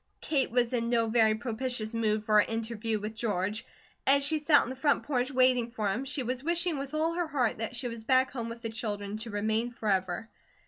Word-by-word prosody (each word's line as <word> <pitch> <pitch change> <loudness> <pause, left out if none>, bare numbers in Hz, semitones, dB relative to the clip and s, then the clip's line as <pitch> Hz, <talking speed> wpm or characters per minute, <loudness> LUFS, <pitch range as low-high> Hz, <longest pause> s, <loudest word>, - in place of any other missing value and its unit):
Kate 280 -4 0
was 240 +1 +1
in 235 -1 0
no 235 -1 +2
very 220 -1 +4
propitious 235 -1 -2
mood 215 -2 0
for 215 0 +3
her - - +8
interview 225 0 -2
with 215 +1 -5
George. 210 -2 -2 0.4
As 280 +1 +6
she 310 +2 +1
sat 295 0 +5
on 245 - -5
the - - -6
front 285 +2 +1
porch 255 -3 0
waiting 255 -3 +3
for 220 -3 -2
him, 245 +7 -3
she 280 0 0
was 250 +2 -3
wishing 340 -1 0
with 275 +2 -5
all 320 +2 +1
her 345 -1 -1
heart 255 -8 0
that 225 +2 -3
she 245 +1 -3
was 230 -1 -7
back 260 +2 +3
home 235 -3 -4
with 230 +1 -9
the 225 - -2
children, 205 -2 -4
to 225 +1 -7
remain 220 +3 0
forever. 195 -3 -1
235 Hz, 225 wpm, -29 LUFS, 220-260 Hz, 0.4 s, her